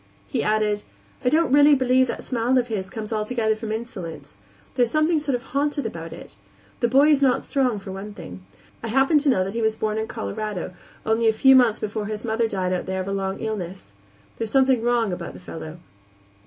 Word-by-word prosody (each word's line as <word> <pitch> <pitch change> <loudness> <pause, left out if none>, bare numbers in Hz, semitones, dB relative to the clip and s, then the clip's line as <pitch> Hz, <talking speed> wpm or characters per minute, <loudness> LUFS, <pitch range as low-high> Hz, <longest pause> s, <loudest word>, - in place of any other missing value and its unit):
He - - -1
added: 210 -1 +1 0.4
"I 250 - +3
don't 315 +1 +2
really 290 +1 +7
believe 260 0 +3
that - - -5
smile 250 +1 +1
of 245 -1 +1
his 190 -4 -3
comes 220 +1 -5
altogether 220 +1 0
from 220 0 -6
insolence; 185 - -6 0.4
there's 245 -3 +2
something 310 +3 +2
sort 285 -3 -1
of 245 - -5
haunted 285 +1 -1
about 165 -6 -6
it. - - -11 0.4
The 240 - +2
boy 275 +5 +5
is 290 -2 +4
not 265 -2 +3
strong, 255 -6 0
for 195 -1 -8
one 200 +2 -7
thing. 90 0 -10 0.4
I 230 - -4
happen 270 +6 +3
to 290 0 +1
know 190 -8 +3
that 195 +1 -5
he 230 - -2
was 220 0 +1
born 215 0 -1
in 220 - -2
Colorado, 180 - -4 0.3
only 225 +1 +2
a 220 - +4
few 265 +5 +6
months 245 -4 +4
before 210 0 -3
his 215 +1 -5
mother 225 0 +1
died 185 -3 -1
out 180 - -3
there 190 0 -2
of 185 - -6
a - - -2
long 195 0 -2
illness. 190 - -5 0.5
There 225 - -2
is - - -5
something 265 -3 +4
wrong 235 -4 +1
about 175 -1 -6
the - - -10
fellow." 165 -2 -8
220 Hz, 220 wpm, -23 LUFS, 195-255 Hz, 0.5 s, really